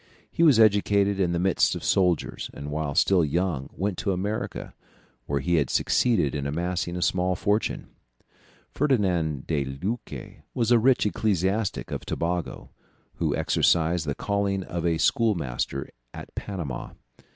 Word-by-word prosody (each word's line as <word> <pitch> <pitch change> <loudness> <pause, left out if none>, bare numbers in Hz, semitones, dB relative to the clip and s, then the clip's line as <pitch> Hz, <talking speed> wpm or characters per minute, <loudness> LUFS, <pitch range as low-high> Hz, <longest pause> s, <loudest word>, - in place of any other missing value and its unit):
He - - -2
was 150 -9 +6
educated 100 -2 +3
in 90 -3 +2
the 85 - 0
midst 95 +1 +2
of - - -6
soldiers, 90 -5 +1
and 70 +1 -6
while 75 -2 -2
still 95 -3 +4
young 80 -2 -1
went 100 0 -3
to 105 -2 0
America, 100 +4 -4 0.5
where 70 -1 -1
he 85 +4 +1
had 70 -5 +1
succeeded 110 - +2
in 70 -1 -2
amassing 85 +3 -2
a 90 - -1
small 90 0 +1
fortune. 105 +4 -1 0.8
Ferdinand 90 - 0
de 75 -4 0
Luque 90 - -6
was 120 -1 +1
a 120 - +6
rich 125 +1 +3
ecclesiastic 100 0 0
of - - -4
Tobago, 85 0 -3 0.5
who - - 0
exercised 80 -1 +2
the 70 - -1
calling 100 -1 -1
of 85 -1 -3
a 85 -1 +1
schoolmaster 80 - 0 0.3
at - - -9
Panama. 85 -11 -5
90 Hz, 145 wpm, -26 LUFS, 80-105 Hz, 0.8 s, was